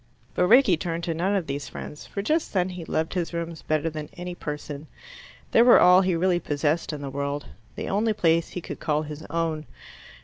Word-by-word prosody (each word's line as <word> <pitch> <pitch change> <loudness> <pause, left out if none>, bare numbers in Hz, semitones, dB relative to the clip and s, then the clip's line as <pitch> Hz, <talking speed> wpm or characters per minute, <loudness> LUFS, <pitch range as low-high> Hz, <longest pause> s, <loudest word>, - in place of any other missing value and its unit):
But 180 - +2
Rickie 230 -6 +6
turned 170 0 -3
to 165 - -1
none 185 +5 0
of 190 -4 0
these 140 -3 -4
friends, 150 +5 -8
for 200 - -4
just 310 +9 0
then 185 -2 +1
he 180 -2 -7
loved 160 0 -1
his 175 -2 -2
rooms 170 -1 -4
better 155 +1 0
than 155 -2 -5
any 180 0 -5
person. 150 -2 -6 0.6
They - - +6
were 240 +1 +8
all 180 +1 +7
he 185 -2 +1
really 175 +1 +2
possessed 150 +2 -1
in 150 -2 -6
the 135 - -5
world, 140 +1 -3 0.3
the - - -4
only 215 +3 +1
place 165 -4 +2
he 180 - -6
could - - -7
call 150 0 0
his 150 0 -7
own. 160 -1 -2
165 Hz, 210 wpm, -25 LUFS, 150-180 Hz, 0.6 s, were